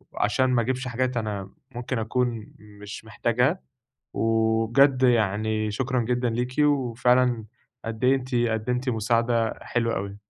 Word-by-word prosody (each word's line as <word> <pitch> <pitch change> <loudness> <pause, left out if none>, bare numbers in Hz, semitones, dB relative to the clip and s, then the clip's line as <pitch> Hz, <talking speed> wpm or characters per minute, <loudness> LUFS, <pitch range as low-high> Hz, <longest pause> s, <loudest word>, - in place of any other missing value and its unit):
عشان 130 0 +1
ما 120 -2 +2
أجيبش 130 +2 -2
حاجات 125 +1 -1
أنا 100 -3 -4 0.2
ممكن 120 0 -3
أكون 115 -1 -2
مش 105 +1 -11
محتاجها، 125 +9 0 0.5
وبجد 115 +4 +2
يعني 110 -2 +1
شكرًا 130 +3 -1
جدًا 125 +1 0
ليكِ، 125 +2 -3
وفعلًا 125 -4 +2 0.4
قد 115 +2 -5
إيه 130 +2 +5
أنتِ 130 -1 -4
قدمتِ 120 +2 0
مساعدة 115 0 +1
حلوة 115 -1 -1
أوي. 100 +1 -6
120 Hz, 125 wpm, -25 LUFS, 110-125 Hz, 0.5 s, إيه